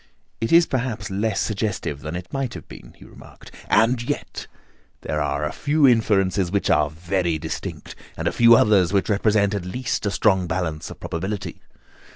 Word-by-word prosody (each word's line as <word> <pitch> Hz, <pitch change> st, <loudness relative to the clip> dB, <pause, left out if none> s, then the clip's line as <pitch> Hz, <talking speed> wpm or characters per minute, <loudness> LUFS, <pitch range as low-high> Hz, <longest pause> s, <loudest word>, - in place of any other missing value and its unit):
"It 115 Hz, -, -2 dB
is 170 Hz, 0 st, +7 dB
perhaps 120 Hz, -6 st, -3 dB
less 100 Hz, +1 st, -1 dB
suggestive 105 Hz, -9 st, -2 dB
than 75 Hz, +2 st, -6 dB
it 90 Hz, 0 st, -8 dB
might 135 Hz, -3 st, -3 dB
have -, -, -10 dB
been," -, -, -13 dB
he -, -, -15 dB
remarked, -, -, -15 dB, 0.2 s
"and 120 Hz, +2 st, +3 dB
yet 120 Hz, -, -5 dB, 0.5 s
there 75 Hz, -, -2 dB
are 75 Hz, 0 st, -1 dB
a 75 Hz, -, -2 dB
few 150 Hz, -1 st, +2 dB
inferences 100 Hz, -6 st, +2 dB
which 100 Hz, 0 st, 0 dB
are 75 Hz, -, +3 dB
very 85 Hz, +1 st, -1 dB
distinct, 80 Hz, +1 st, -6 dB, 0.2 s
and -, -, -2 dB
a -, -, +2 dB
few 115 Hz, 0 st, +6 dB
others 100 Hz, -6 st, +4 dB
which 100 Hz, +1 st, +1 dB
represent 105 Hz, 0 st, +2 dB
at 100 Hz, -3 st, -3 dB
least 120 Hz, +3 st, -3 dB
a -, -, +2 dB
strong 95 Hz, -3 st, +2 dB
balance 80 Hz, -3 st, -3 dB
of -, -, -11 dB
probability. 95 Hz, +5 st, -5 dB
100 Hz, 180 wpm, -22 LUFS, 90-115 Hz, 0.5 s, is